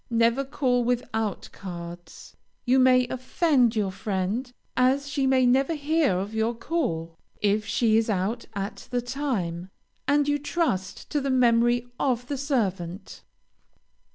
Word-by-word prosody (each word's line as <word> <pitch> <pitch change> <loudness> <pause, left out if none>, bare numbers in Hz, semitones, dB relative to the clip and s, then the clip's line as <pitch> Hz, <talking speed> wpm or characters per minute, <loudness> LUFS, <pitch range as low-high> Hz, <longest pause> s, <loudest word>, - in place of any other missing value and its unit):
Never 235 +3 +2
call 260 -3 0
without 225 -4 -2
cards. 175 -2 -9 0.3
You 260 +1 +4
may 255 -1 +5
offend 255 -2 +2
your 205 -3 0
friend, 200 +5 -2 0.2
as 265 +3 +2
she 275 -1 0
may 260 -1 +4
never 270 +6 +3
hear 295 - +1
of 200 +3 -4
your 220 +2 0
call, 195 - -2 0.2
if 210 +1 +1
she 220 -2 +3
is 225 0 +1
out 210 +4 -1
at 200 +1 -5
the 245 -1 -1
time, 220 -10 -3 0.4
and 290 0 +3
you 290 0 +1
trust 285 - -2
to 295 - +1
the 275 - -2
memory 240 -1 +3
of 250 -3 0
the 285 - -2
servant. 195 - -2
240 Hz, 140 wpm, -26 LUFS, 200-270 Hz, 0.4 s, may